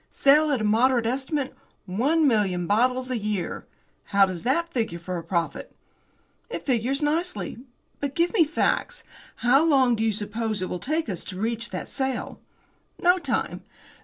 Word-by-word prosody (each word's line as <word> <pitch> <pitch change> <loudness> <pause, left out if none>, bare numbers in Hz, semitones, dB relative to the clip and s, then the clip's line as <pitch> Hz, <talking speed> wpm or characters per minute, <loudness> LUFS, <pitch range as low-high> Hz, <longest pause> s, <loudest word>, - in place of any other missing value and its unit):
Sale, 300 +2 +4
at 270 -6 +1
a - - -1
moderate 235 +3 +3
estimate, 265 +3 -2 0.3
one 280 - +2
million 195 -7 +1
bottles 250 +6 +1
a 245 - -1
year. 210 -3 -3 0.4
How 200 -1 +4
does 185 -3 -5
that 335 +8 0
figure 225 -8 -1
for 175 +1 -5
a - - -9
profit?" 170 0 -3 0.7
"It - - -5
figures 260 +3 +1
nicely. 330 -2 -1 0.4
But 280 -1 -3
give 340 +1 +1
me 385 -7 +5
facts. 315 +1 -1 0.4
How 270 +5 +5
long 265 -6 +4
do 220 - -4
you 225 - +2
suppose 215 +1 -2
it - - -3
will 180 - -3
take 310 - -1
us 180 -5 -4
to 185 -1 -6
reach 230 +2 -2
that - - -5
sale?" 265 -3 -3 0.6
"No 355 +1 +4
time. 350 - -2
245 Hz, 165 wpm, -25 LUFS, 210-285 Hz, 0.7 s, me